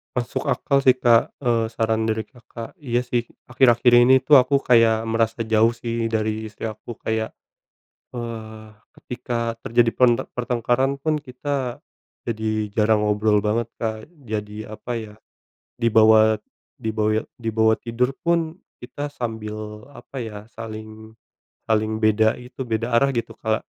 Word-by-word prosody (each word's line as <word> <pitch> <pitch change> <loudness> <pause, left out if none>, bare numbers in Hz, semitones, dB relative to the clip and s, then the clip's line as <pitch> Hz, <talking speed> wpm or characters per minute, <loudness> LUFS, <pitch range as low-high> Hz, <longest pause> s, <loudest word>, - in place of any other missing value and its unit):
Masuk 120 -3 -2
akal 140 - +1
sih 130 - +7
Kak, 120 -2 +4
eee, 115 -4 0
saran 110 -1 0
dari 110 -1 -1
Kakak, 120 - -11
iya, 120 -3 +1
sih, 125 -1 -1 0.2
akhir-akhir 120 -1 +4
ini 125 +2 +7
tuh 140 +3 +5
aku 140 +2 +2
kayak 115 -3 +3
merasa 115 0 0
jauh 110 +1 +4
sih 115 -1 -3
dari 110 0 -2
istri 105 - -5
aku 110 +1 -9
kayak, 110 0 -2 0.8
eee, 110 -2 -7 0.2
ketika 115 -1 -4
terjadi 115 0 +3
pen 125 -1 +6 0.3
pertengkaran 125 +3 0
pun 155 +1 +1
kita, 135 -1 -4 0.5
jadi 110 -1 -2
jarang 105 +1 +2
ngobrol 105 0 +2
banget 110 +3 0 0.2
Kak 110 -1 -3
jadi 110 -6 -6
apa 120 - -7
ya, 110 -3 -5 0.7
dibawa 110 -1 +5 0.4
dibawa 110 0 0 0.2
dibawa 110 -1 +2
tidur 125 +2 -1
pun 170 0 0 0.2
kita 145 +4 -6
sambil 110 -6 -5 0.4
apa 135 - -8
ya 105 -3 -7
saling 110 0 -9 0.5
saling 110 0 +1
beda 110 +1 +3
itu 125 +1 -13
beda 115 +2 -1
arah 140 +3 +4
gitu 115 - -2
kalak 110 0 -1
115 Hz, 135 wpm, -22 LUFS, 110-125 Hz, 0.8 s, sih